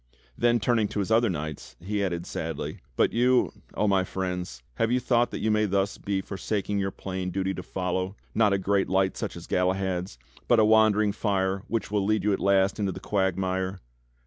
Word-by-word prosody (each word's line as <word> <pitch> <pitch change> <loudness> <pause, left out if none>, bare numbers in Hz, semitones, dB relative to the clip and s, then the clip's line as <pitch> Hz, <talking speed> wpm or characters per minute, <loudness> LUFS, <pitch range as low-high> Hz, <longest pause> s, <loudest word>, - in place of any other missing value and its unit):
Then 120 0 +3
turning 115 -1 +2
to 105 - -4
his 100 +2 -2
other 115 0 +4
knights, 75 -4 -5
he 100 +3 -2
added 85 -3 -2
sadly: - - -4 0.2
"But - - +2
you. 125 +2 +3 0.2
Oh 105 - +1
my 95 -2 +3
friends, 90 -9 -4
have 115 +1 +1
you 125 - +3
thought 120 -1 +2
that - - -5
you 110 - +1
may 105 0 +3
thus 100 0 0
be 100 -1 -1
forsaking 100 +1 -2
your 95 0 0
plain 95 -1 -4
duty 95 +1 -1
to 90 - -5
follow, 95 +1 -2 0.2
not 105 -2 +3
a 100 - +3
great 95 0 +1
light 95 0 +2
such - - -4
as - - -9
Galahad's, 90 -3 -1 0.3
but 120 - +5
a 110 - +6
wandering 110 -1 +4
fire 95 -2 0
which 115 -3 -2
will 105 -2 +1
lead 105 0 +1
you 105 0 +2
at - - -1
last 100 +1 +2
into 100 -2 0
the - - -7
quagmire. 95 -1 -1
100 Hz, 200 wpm, -27 LUFS, 95-105 Hz, 0.3 s, a